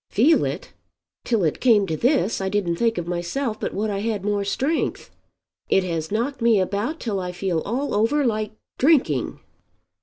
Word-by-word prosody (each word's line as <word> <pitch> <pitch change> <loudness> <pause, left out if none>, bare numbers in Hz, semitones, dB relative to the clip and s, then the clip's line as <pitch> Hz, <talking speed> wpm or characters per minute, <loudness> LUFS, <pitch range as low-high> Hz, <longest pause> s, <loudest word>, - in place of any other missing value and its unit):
"Feel 285 +10 +4
it! - - -5 0.5
Till 225 -5 +1
it 155 - 0
came 220 -5 +5
to 160 - -2
this 240 - +1
I 190 - -1
didn't 190 -4 0
think 230 +2 +1
of 175 - -2
myself 180 +8 -2
but - - -2
what 210 +1 -2
I 200 - -2
had 210 -2 -2
more 205 -1 0
strength. 270 +10 -1 0.6
It 195 - +3
has 165 -2 -3
knocked 240 +5 -1
me 230 -3 +4
about 205 - -1
till 210 -5 -2
I 180 -1 -3
feel 180 -2 -1
all 265 +7 -2
over 250 +8 +2
like 215 -2 -1 0.3
drinking." 250 - +2
210 Hz, 180 wpm, -23 LUFS, 190-240 Hz, 0.6 s, came